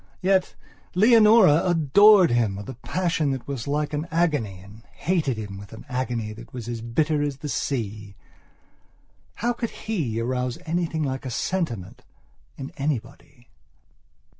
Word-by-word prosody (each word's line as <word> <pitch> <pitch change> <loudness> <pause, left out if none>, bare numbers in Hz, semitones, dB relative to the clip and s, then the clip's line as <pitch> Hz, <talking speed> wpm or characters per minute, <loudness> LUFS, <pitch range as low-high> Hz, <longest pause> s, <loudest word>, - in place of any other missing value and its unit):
Yet, 190 0 +2 0.4
Leonora 215 -5 +6
adored 180 - +5
him 115 -5 +1
with 100 0 -8
a 130 - -5
passion 165 +3 -1
that 130 -3 -6
was 140 -3 -5
like 150 +1 -1
an 150 +3 -2
agony, 150 - 0
and 100 +4 -14
hated 160 -9 -1
him 100 -3 -6
with 100 +1 -12
an 110 - -11
agony 125 -4 -3
that 115 +1 -12
was 120 -3 -7
as 120 -1 -4
bitter 150 +6 0
as 145 -2 -2
the 150 - -6
sea. 105 -8 -3 1.2
How 240 +2 0
could 235 -1 -3 0.2
he 155 - -1
arouse 125 +1 -2
anything 165 -1 -1
like 135 -2 -3
a 130 - -5
sentiment, 120 - -3 0.6
in 135 0 -7
anybody? 140 -2 -5
140 Hz, 145 wpm, -24 LUFS, 115-170 Hz, 1.2 s, Leonora